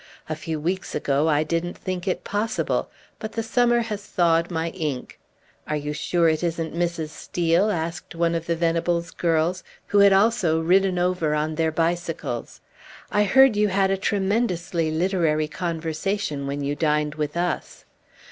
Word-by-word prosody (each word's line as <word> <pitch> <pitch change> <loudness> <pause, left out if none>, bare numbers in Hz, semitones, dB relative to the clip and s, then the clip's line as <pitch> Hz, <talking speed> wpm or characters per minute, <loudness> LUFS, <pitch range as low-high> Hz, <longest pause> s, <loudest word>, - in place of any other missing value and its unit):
A 155 - -2
few 155 0 -4
weeks 180 +5 -2
ago 140 +2 +1
I 150 0 +3
didn't 170 +2 -2
think 185 0 -4
it 185 - -1
possible; 215 +2 -1 0.3
but 220 0 -6
the 225 0 -2
summer 240 +1 +3
has 210 -3 -4
thawed 170 -3 +2
my 165 -1 -2
ink." 150 -8 -4 0.5
"Are 150 - -1
you 150 0 -3
sure 170 +2 +1
it 160 +1 +1
isn't 165 -1 -2
Mrs. 170 -2 -1
Steel?" 170 +5 +1
asked 165 -2 -3
one 170 0 +1
of 165 0 -3
the 170 - +1
Venables 170 +1 0
girls, 170 +2 0 0.2
who 205 - +2
had 200 0 +7
also 195 -5 +3
ridden 185 +3 +3
over 175 -4 +1
on 155 +1 -1
their 160 0 0
bicycles. 165 -6 -2 0.5
"I 210 0 +3
heard 265 +2 +6
you 210 0 +3
had 195 0 +2
a - - +3
tremendously 190 -4 0
literary 160 -2 +1
conversation 165 -1 -3
when 140 +1 -3
you 140 +1 -1
dined 150 -1 +1
with 150 +1 -3
us." 175 +1 -3
170 Hz, 165 wpm, -24 LUFS, 160-190 Hz, 0.5 s, had